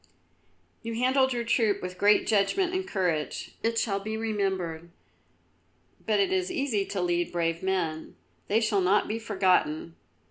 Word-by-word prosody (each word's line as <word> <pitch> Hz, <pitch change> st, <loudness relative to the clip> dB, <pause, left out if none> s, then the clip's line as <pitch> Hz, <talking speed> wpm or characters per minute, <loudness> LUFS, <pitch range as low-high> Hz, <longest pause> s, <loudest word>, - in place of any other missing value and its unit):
"You 230 Hz, 0 st, -5 dB
handled 260 Hz, +2 st, +2 dB
your 240 Hz, -1 st, -1 dB
troop 225 Hz, -3 st, +1 dB
with 180 Hz, 0 st, -7 dB
great 205 Hz, +1 st, +4 dB
judgment 290 Hz, -, +1 dB
and 375 Hz, 0 st, -2 dB
courage. 175 Hz, -, -2 dB
It 230 Hz, 0 st, 0 dB
shall 200 Hz, -4 st, 0 dB
be 215 Hz, +2 st, -4 dB
remembered. 190 Hz, -7 st, -2 dB, 1.2 s
But -, -, +2 dB
it 390 Hz, -2 st, +2 dB
is 375 Hz, 0 st, 0 dB
easy 270 Hz, -, 0 dB
to 195 Hz, -, -3 dB
lead 175 Hz, -1 st, 0 dB
brave 165 Hz, -1 st, -1 dB
men; 175 Hz, -5 st, -2 dB, 0.3 s
they 220 Hz, +3 st, +2 dB
shall 215 Hz, -3 st, +1 dB
not 190 Hz, +3 st, +3 dB
be 220 Hz, +2 st, -3 dB
forgotten. 185 Hz, -7 st, +1 dB
205 Hz, 150 wpm, -27 LUFS, 180-230 Hz, 1.2 s, great